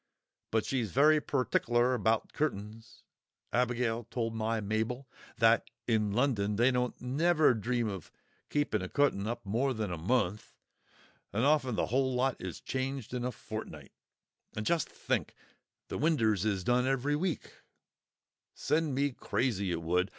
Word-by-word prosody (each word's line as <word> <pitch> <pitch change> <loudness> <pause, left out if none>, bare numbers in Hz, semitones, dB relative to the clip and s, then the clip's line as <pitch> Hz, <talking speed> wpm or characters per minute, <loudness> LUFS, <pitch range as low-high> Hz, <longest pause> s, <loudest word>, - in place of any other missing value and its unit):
But 110 -1 +1
she's 125 -6 -1
very 150 - +5
pertickler 125 -2 +1
about 110 -1 +1
cutt'ns. 110 -5 -4 0.5
Abigail 120 -1 +1
told 115 -2 -2
my 110 0 -1
Mabel, 110 +5 -2 0.3
that 115 0 +4 0.2
in 110 -3 +2
London 105 -4 +1
they 120 +5 +4
don't 125 -1 -1
never 155 +4 +3
dream 120 +1 -1
of 95 -6 -6 0.4
keeping 145 -8 0
a 90 - -4
cutt'n 140 -8 +1
up 120 -1 -4
more 125 +6 0
than 110 -4 -2
a 85 - -4
month, 105 +1 0 0.8
and 115 +5 +1
often 140 -5 +3
th'whole 130 +3 +1
lot 130 +1 +1
is 95 -2 -5
changed 130 -2 -3
in 125 -1 -2
a 125 - -1
fortnight; 105 - -8 0.6
and 105 - -3
just 165 +1 +1
think, - - -2 0.5
the - - -4
winders 115 - +2
is 100 -4 0
done 125 +4 +2
every 135 +2 +1
week! 170 0 -2 1.0
Send 150 -2 0
me 140 +1 +1
crazy, 110 -6 -1
it 85 -1 -2
would! 90 +3 +1
120 Hz, 145 wpm, -31 LUFS, 105-135 Hz, 1.0 s, very